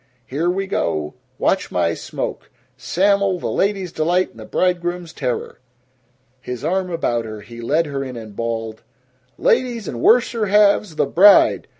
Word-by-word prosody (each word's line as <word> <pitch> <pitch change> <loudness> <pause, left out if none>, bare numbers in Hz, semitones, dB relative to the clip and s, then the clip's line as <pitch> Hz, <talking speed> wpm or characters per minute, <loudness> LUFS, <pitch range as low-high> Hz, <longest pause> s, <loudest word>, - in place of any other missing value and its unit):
Here 155 +7 -1
we 195 +2 -1
go! 75 - -2 0.2
Watch - - 0
my 85 -2 +1
smoke - - -5 0.3
Sam'l, 200 0 +1
the - - -3
ladies' 195 -3 -1
delight 175 +4 0
and - - -17
the - - -9
bridegrooms' 175 -2 -1
terror!" 125 - -4 0.8
His 125 -1 -7
arm 185 +3 -1
about 120 -9 -1
her, 110 -1 -7
he 115 +2 -11
led 150 +8 +1
her 140 -2 -4
in 130 -2 -7
and 110 -3 -10
bawled, 115 -1 -4 0.6
"Ladies 240 -5 +1
and 120 - -5
worser 230 -2 +3
halves, 205 -3 +3
the - - +2
bride! 200 +4 +5
170 Hz, 155 wpm, -20 LUFS, 115-195 Hz, 0.8 s, bride